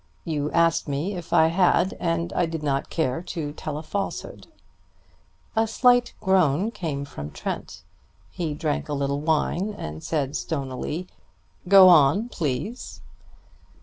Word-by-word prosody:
You 150 -2 -1
asked 165 0 +2
me 145 +8 -2
if 175 -3 -8
I 160 0 +5
had, 180 +1 +2
and 170 0 -1
I 175 - +1
did 160 -1 -5
not 140 -2 -1
care 155 -3 -1
to 160 -5 -5
tell 150 -1 -5
a 155 - -6
falsehood." 195 +5 -5 1.1
A 225 0 +2
slight 245 +1 +3
groan 190 +1 +2
came 145 -9 -4
from 75 - -7
Trent. - - -6 0.5
He 155 - -3
drank 150 0 -2
a - - -1
little 140 0 -1
wine, 165 +6 0
and 75 +1 -6
said 145 -3 -2
stonily: 140 +3 -3 0.6
"Go 190 0 +9
on, 175 - +5
please." 165 - -4
160 Hz, 140 wpm, -24 LUFS, 145-185 Hz, 1.1 s, Go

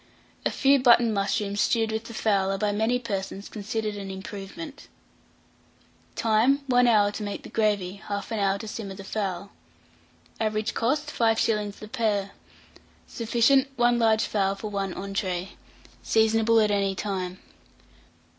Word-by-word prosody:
A - - 0
few 275 0 +3
button 235 -2 +5
mushrooms 200 0 0
stewed 225 -2 +1
with 220 +1 -3
the 230 - -9
fowl 200 -3 +1
are 195 - -1
by 210 +1 0
many 220 +4 +1
persons 200 -4 -4
considered 215 0 -4
an 200 -1 -6
improvement. 200 +10 -8 1.3
Time. 230 +6 +2
1 245 -2 +4
hour 210 -3 +4
to 210 - -6
make 205 -1 -5
the - - -10
gravy, 205 -3 0
1/2 205 +2 -3
hour 195 -1 +2
to 220 +2 -8
simmer 205 -2 -6
the 195 - -9
fowl. 195 -2 -3 0.9
Average 215 0 -1
cost, 275 +6 -1
5s. 220 -2 +1
the 215 - -10
pair. 210 -4 -1 0.7
Sufficient. 240 +4 +2
1 240 -1 +3
large 220 -1 +3
fowl 195 -2 0
for 210 +1 -6
one 195 -1 -2
entrée. 190 -2 -3 0.5
Seasonable 225 0 +3
at 210 -1 +2
any 195 -1 +1
time. 185 -2 -3
215 Hz, 145 wpm, -26 LUFS, 200-230 Hz, 1.3 s, button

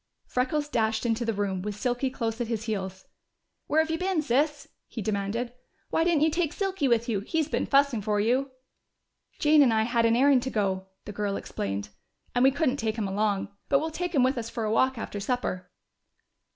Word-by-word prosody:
Freckles 275 +4 -1
dashed 220 -4 0
into 235 0 0
the 225 - +1
room, 195 -2 -1
with 205 +1 -4
Silky 245 +4 -1
close 230 -2 -3
at 240 - -1
his 225 -2 -2
heels. 190 -4 -4 0.6
"Where 315 +2 +4
have 320 0 -2
you 325 - -1
been, 365 -4 0
Sis?" 295 +3 +1 0.2
he - - -7
demanded. 215 +4 -2 0.4
"Why 325 - +2
didn't 330 -3 +3
you 315 - +3
take 330 -1 0
Silky 385 -7 -1
with 235 -1 +2
you? 220 -4 0
He's 315 - -1
been - - -1
fussing 275 -5 +3
for 210 0 0
you." 250 +6 +1 0.9
"Jane 300 0 +5
and 260 -4 +5
I 220 0 +3
had 230 0 +2
an 230 - +3
errand 270 +1 +5
to 260 - -3
go," 190 -4 -1 0.2
the - - -6
girl 205 -1 -2
explained. 100 - -4 0.4
"And 245 - +2
we 265 - +7
couldn't 280 -1 0
take 220 -3 -2
him 210 -3 -1
along. 200 0 0 0.2
But 275 - +5
we'll 320 +3 -2
take 355 +1 -3
him 265 - +5
with 260 0 +2
us 230 -1 -5
for 230 - -4
a 215 - 0
walk 260 +3 +2
after 210 -2 -5
supper." 210 -4 -2
240 Hz, 210 wpm, -27 LUFS, 210-285 Hz, 0.9 s, we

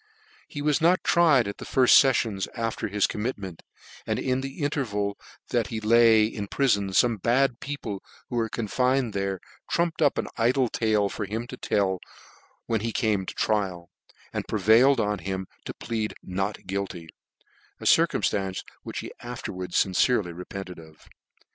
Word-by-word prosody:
He 145 - -6
\vas 150 0 +1
not 170 +1 +4
tried 155 -9 +4
at 100 - -5
the - - -7
nYft 130 -2 +6
feffions 115 -8 +1
after 115 -2 -2
his 100 0 +1
commitment, 105 -6 -4 0.5
and - - 0
in 130 0 0
the 135 +3 -6
interval 105 -9 -1 0.3
that 120 -4 +1
he 110 +1 -4
lay 110 0 +5
in 105 -2 -4
ptiion 100 -6 +1
/ome 110 +2 +2
bad 125 +2 +2
people 115 -9 -5 0.3
who 120 - -4
were 115 -1 0
confined 125 +2 0
there 95 -1 -2 0.3
trumpted 170 -1 +1
up - - +3
an - - -1
iJlc 125 +1 +2
tale 110 -3 +2
for 105 +1 -4
him 110 +4 -4
i& - - -5
tell 95 -6 0 0.7
when 115 -2 0
he 115 +1 -2
came 105 -4 0
to - - -6
trial, 95 -5 -1 0.4
and - - -3
prevailed 115 +6 +4
on 105 -2 0
him 95 +1 -4 0.2
to - - -5
plead 110 -2 -3
not 95 +3 -3
guilty; 95 -3 -4 0.7
a - - -11
circumftance 95 -2 +2 0.2
which - - -5
he - - -8
afterwards 90 -1 -2
fin* 95 - -7
cerely 95 -5 +2
repented 90 0 -7
oi. 80 -1 -14
110 Hz, 160 wpm, -26 LUFS, 100-125 Hz, 0.7 s, nYft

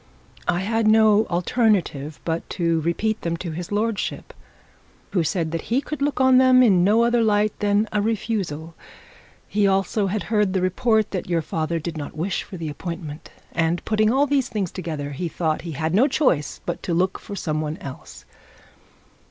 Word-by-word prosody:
I 175 +1 +1
had 225 +2 0
no 215 -1 +5
alternative 175 - 0
but 165 0 -2
to 170 -2 +1
repeat 215 +7 -1
them 170 0 -2
to 170 0 -5
his 175 +4 -6
lordship, 215 0 -2 0.8
who 180 -4 +1
said 160 0 -1
that 165 - -4
he 240 +3 +3
could 295 +1 -6
look 285 -1 0
on 260 -1 +6
them 255 -1 +6
in 190 -7 +5
no 215 +5 +4
other 235 0 +3
light 210 -1 +2
than 205 +1 +2
a 210 - +2
refusal. 195 -7 -2 0.7
He 205 -1 +2
also 195 +1 +1
had 205 +2 -2
heard 210 -3 +1
the 190 - +1
report 215 +3 +1
that 185 -2 -4
your 170 -2 +1
father 160 +2 -2
did 165 0 -5
not 145 0 -7
wish 175 +4 -1
for 185 - -9
the 165 -2 -5
appointment, 155 0 -6 0.2
and 170 +1 0
putting 215 0 +2
all 275 +3 +3
these 275 -2 +1
things 200 -6 -2
together, 155 -6 -5
he 155 +5 -3
thought 160 -1 -1
he 165 -1 -6
had 160 +3 -2
not 250 +9 +4
choice 255 - +1
but 175 - -3
to 170 - -2
look 185 +2 0
for 205 - -8
some 155 -4 -2
one 155 0 -3
else. 135 -2 -10
190 Hz, 185 wpm, -23 LUFS, 165-220 Hz, 0.8 s, on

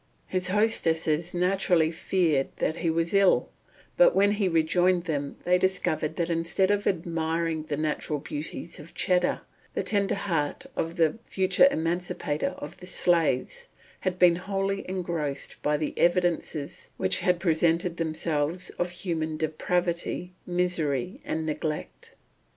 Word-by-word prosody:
His 185 -1 -1
hostesses 170 -5 +1
naturally 180 -2 +2
feared 165 -4 +1
that 160 - -1
he 170 -1 0
was 165 +2 0
ill; 195 -1 +4 0.5
but - - +6
when 200 +1 +4
he 205 -2 +1
rejoined 175 +2 +2
them 145 -5 -3
they 180 0 +3
discovered 160 -5 0
that 170 -1 -1
instead 170 +4 +1
of 205 0 0
admiring 165 -2 -1
the 150 -2 -3
natural 155 0 -1
beauties 150 +3 -6
of 150 +3 -12
Cheddar, 180 0 +1 0.3
the - - 0
tender 200 -2 +1
heart 175 - -2
of 165 +1 -2
the 165 +4 +2
future 190 +6 +4
emancipator 165 - -2
of 150 +3 -8
the 180 - -11
slaves 175 - +1 0.3
had 185 -1 -2
been 175 -2 +5
wholly 195 +1 -2
engrossed 170 -6 -3
by 150 0 +1
the 150 0 -3
evidences 175 -4 0
which 95 0 +2
had 180 -1 +2
presented 170 0 +1
themselves 160 +1 -1
of 175 - 0
human 165 -3 -3
depravity, 175 +3 -1
misery, 175 -4 -1
and 160 0 -3
neglect. 150 - -4
170 Hz, 135 wpm, -27 LUFS, 155-180 Hz, 0.5 s, but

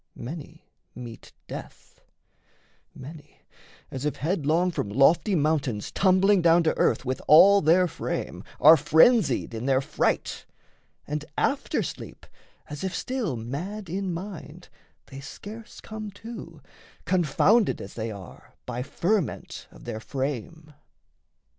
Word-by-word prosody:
Many 160 +5 -9 0.3
meet 120 -2 -10 0.2
death; - - -10 0.9
many, 145 +3 -12 0.5
as 130 0 -5
if 150 - -1
headlong 165 +1 0
From 110 - -3
lofty 160 - +3
mountains 145 - 0
tumbling 190 0 +3
down 170 0 +5
to 160 - +1
earth - - +1
With 130 +1 -2
all 200 +6 +8
their 175 +4 +4
frame, - - -5 0.2
are 155 +2 +9
frenzied 160 - +3
in 115 +3 -4
their 135 -1 +3
fright; 135 - -2 0.6
And 150 0 -3
after 280 0 0
sleep, - - -8 0.4
as 150 +1 -7
if 190 -1 -3
still 250 - -2
mad 165 - -6
in 190 0 -2
mind, 180 +1 -8 0.4
They 135 - -10
scarce 210 +10 -10
come 215 -1 -7 0.2
to, 170 -9 -9 0.4
confounded 185 +5 +3
as 95 - -9
they 115 0 -4
are 100 -4 -11
By 125 - -4
ferment 180 +6 -2
of - - -16
their 110 - -5
frame. 145 +6 -5
160 Hz, 125 wpm, -26 LUFS, 135-190 Hz, 0.9 s, are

